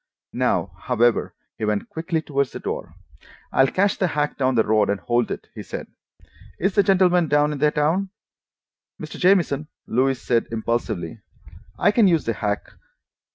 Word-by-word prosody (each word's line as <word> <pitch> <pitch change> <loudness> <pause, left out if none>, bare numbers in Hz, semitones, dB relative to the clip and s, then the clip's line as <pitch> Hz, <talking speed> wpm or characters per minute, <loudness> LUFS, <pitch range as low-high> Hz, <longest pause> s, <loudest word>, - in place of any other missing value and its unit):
Now, - - 0
however, 120 0 +1 0.2
he - - -4
went 105 -1 -1
quickly 160 0 -2
toward 140 -2 0
the - - -8
door. - - -5 0.6
"I'll 135 - +4
catch 200 +7 +1
the 185 - +2
hack 150 -2 -1
down 130 -2 +1
the 110 - +4
road 105 -1 +2
and 100 -1 0
hold 120 +1 0
it," - - -6
he - - -7
said. - - -6 0.7
"Is 195 +3 0
the 200 - +5
gentleman 180 -3 +3
down 150 0 +3
in 145 - -5
the 150 +1 +4
town?" 160 +7 0 0.9
"Mr. - - -8
Jamieson," 175 -6 +3 0.2
Louise 130 +2 +1
said 120 -2 0
impulsively, 110 -6 -3 0.6
"I 205 - +4
can 210 -1 +4
use 165 -4 +2
the 115 - 0
hack. 105 -1 -2
145 Hz, 165 wpm, -23 LUFS, 115-175 Hz, 0.9 s, the